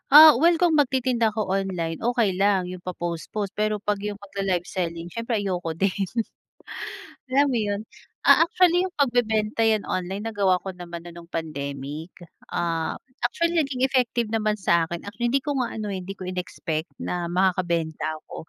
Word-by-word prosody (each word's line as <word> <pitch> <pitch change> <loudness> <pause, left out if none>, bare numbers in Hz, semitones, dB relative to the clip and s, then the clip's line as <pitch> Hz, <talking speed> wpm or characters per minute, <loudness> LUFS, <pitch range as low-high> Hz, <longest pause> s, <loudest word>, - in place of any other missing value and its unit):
Ah, 310 +1 +12
well 340 0 +6
kung 345 -3 +4
magtitinda 255 -4 +2
ako 215 +1 -2 0.2
online, 170 -4 -3
okey 235 -4 +2
lang 200 -2 +4
yung 180 -1 -8
pa-post-post 180 +3 -3
pero 215 0 +2
'pag 205 -1 +1
yung 205 -1 -5
magla-live 195 -3 -2
selling 170 -2 -2
siyempre 230 +3 -2
ayoko 180 -4 -2
din. 195 - +4 1.4
Alam 275 +3 +4
mo - - +2
yun, 205 +1 -1 0.5
ah, - - +9
actually 355 0 +4
yung 365 - -14
pagbebenta 225 -4 +2
yan 215 -2 +1
online 190 +3 -3
nagawa 200 -4 +2
ko 195 - -4
naman 170 -1 -7
na 175 - -8
nung 170 -1 -11
pandemic. 145 +1 -5 0.5
Ah, 165 -2 -1 0.3
actually 335 +8 0
naging 275 -4 -1
effective 245 -3 +1
naman 215 -1 +1
sa'kin 170 0 +2
at 205 - -8
hindi 245 +3 +3
ko 290 - 0
nga 240 - 0
ano 215 -1 -4
eh, 190 - -3
hindi 195 +2 -6
ko 185 - -8
inexpect 170 -3 -4 0.2
na - - -1 0.2
makakabenta 170 -4 +1 0.2
ako. - - -10
195 Hz, 165 wpm, -25 LUFS, 170-235 Hz, 1.4 s, Ah